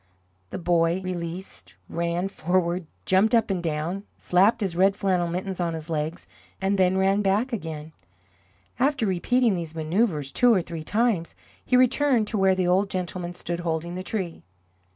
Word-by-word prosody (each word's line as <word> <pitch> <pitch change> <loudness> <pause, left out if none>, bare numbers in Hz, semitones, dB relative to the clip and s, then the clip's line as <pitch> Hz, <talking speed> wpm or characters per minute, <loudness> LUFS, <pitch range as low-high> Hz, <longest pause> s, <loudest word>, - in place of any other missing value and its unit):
The - - -5
boy, 170 0 +2
released, 180 0 -6
ran 170 +2 -1
forward, 175 -2 -1 0.2
jumped 200 +5 +4
up 225 -3 +2
and 185 -2 -1
down, 165 +3 -2 0.2
slapped 195 +6 +3
his 190 -4 -1
red 195 +2 +4
flannel 185 -4 +1
mittens 185 +2 -4
on 170 -2 -1
his 160 +1 -7
legs, 155 +2 -3 0.3
and 195 +1 0
then 185 0 +3
ran 195 +2 +3
back 210 +6 +1
again. 160 -6 -5 0.9
After 270 -2 +2
repeating 220 +5 +2
these 165 -3 -5
manoeuvres 160 - 0
two 245 -1 +4
or 190 -6 +3
three 165 -2 -6
times, 210 -3 0 0.3
he 250 - +3
returned 255 -2 +3
to 215 - -1
where 190 -1 +4
the 185 -1 0
old 190 +3 +2
gentleman 180 -1 -4
stood 175 -1 -4
holding 170 0 -2
the 185 - -4
tree. 185 -4 -4
185 Hz, 165 wpm, -25 LUFS, 170-200 Hz, 0.9 s, jumped